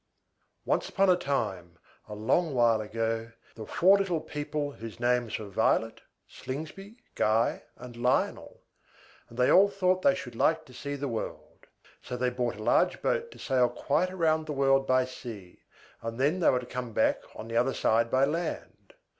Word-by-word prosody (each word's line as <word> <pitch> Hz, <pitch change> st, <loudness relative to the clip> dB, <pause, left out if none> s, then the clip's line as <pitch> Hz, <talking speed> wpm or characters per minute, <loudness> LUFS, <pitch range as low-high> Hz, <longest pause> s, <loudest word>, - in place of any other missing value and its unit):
Once -, -, 0 dB
upon 195 Hz, -1 st, +3 dB
a -, -, +5 dB
time, 95 Hz, -, -3 dB, 0.3 s
a 105 Hz, -, -6 dB
long 135 Hz, +8 st, +1 dB
while 115 Hz, -3 st, +3 dB
ago, 115 Hz, +1 st, -3 dB, 0.2 s
there 110 Hz, -, -8 dB
were -, -, -15 dB
four 195 Hz, +3 st, +5 dB
little 180 Hz, -4 st, 0 dB
people 150 Hz, -1 st, -4 dB
whose 115 Hz, -4 st, -10 dB
names 120 Hz, -1 st, +1 dB
were 110 Hz, -, -7 dB
VIOLET, 110 Hz, +2 st, 0 dB, 0.3 s
SLINGSBY, 160 Hz, -, -8 dB, 0.2 s
GUY, 110 Hz, +2 st, +1 dB
and 125 Hz, -1 st, -11 dB
LIONEL; 125 Hz, +2 st, -1 dB, 0.7 s
and 115 Hz, -, -14 dB
they 125 Hz, 0 st, +3 dB
all 200 Hz, +2 st, +6 dB
thought 185 Hz, -2 st, +1 dB
they 185 Hz, 0 st, +4 dB
should 125 Hz, -10 st, -8 dB
like 160 Hz, +6 st, +1 dB
to 130 Hz, -, -16 dB
see 140 Hz, +3 st, -5 dB
the 140 Hz, 0 st, -3 dB
world. 115 Hz, -3 st, -6 dB, 0.3 s
So 125 Hz, -, -6 dB
they 125 Hz, 0 st, 0 dB
bought 125 Hz, -1 st, -2 dB
a 110 Hz, -, -8 dB
large -, -, +2 dB
boat 475 Hz, -1 st, 0 dB
to -, -, -14 dB
sail 125 Hz, -3 st, +2 dB
quite 175 Hz, +6 st, 0 dB
round 160 Hz, -3 st, +1 dB
the 150 Hz, -, -3 dB
world 135 Hz, -1 st, +2 dB
by 130 Hz, 0 st, +3 dB
sea, 110 Hz, -8 st, -10 dB, 0.4 s
and 115 Hz, +1 st, -5 dB
then 150 Hz, +7 st, +2 dB
they 175 Hz, -, +4 dB
were 125 Hz, -, +2 dB
to -, -, -9 dB
come 125 Hz, -2 st, -6 dB
back -, -, +2 dB
on 110 Hz, -, -8 dB
the 115 Hz, 0 st, -2 dB
other 125 Hz, +3 st, +2 dB
side 115 Hz, +1 st, +2 dB
by 130 Hz, +2 st, +3 dB
land. 165 Hz, -, -5 dB
130 Hz, 185 wpm, -28 LUFS, 115-155 Hz, 0.7 s, all